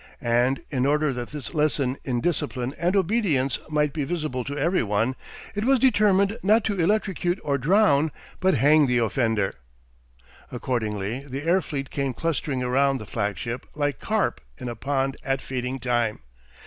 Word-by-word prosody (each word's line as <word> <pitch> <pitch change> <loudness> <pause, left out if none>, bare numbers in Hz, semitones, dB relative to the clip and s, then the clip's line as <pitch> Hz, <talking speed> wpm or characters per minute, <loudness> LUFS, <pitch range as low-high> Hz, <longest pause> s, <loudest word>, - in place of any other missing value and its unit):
And 120 +3 +2
in 130 -1 +1
order 150 -1 +2
that 120 -1 -5
this 150 -1 -6
lesson 145 -4 +1
in 125 -3 -1
discipline 140 -6 -1
and 175 +3 +1
obedience 180 - +1
might 150 -2 +1
be 150 - -1
visible 150 -5 -2
to 140 +1 -4
every 170 +6 +2
one, 110 +4 0 0.4
it 205 +1 -2
was 270 +3 +4
determined 210 -4 +3
not 215 +3 +4
to 200 -4 0
electrocute 190 -1 +1
or 140 -1 0
drown 155 -1 +3 0.3
but 190 0 +3
hang 150 +1 +5
the 125 -1 +2
offender. 115 -4 +1 1.0
Accordingly 110 -2 -2
the 135 +2 -5
air 175 +4 +3
fleet 140 -4 -5
came 135 -3 -2
clustering 145 -5 -1
round 135 +2 +2
the 110 - -8
flagship 115 +3 -3
like 145 -4 -1
carp - - 0 0.2
in 125 - -6
a 120 - -5
pond 135 +2 -1
at 135 -1 0
feeding 130 0 -3
time. 120 -3 0
140 Hz, 160 wpm, -25 LUFS, 125-165 Hz, 1.0 s, hang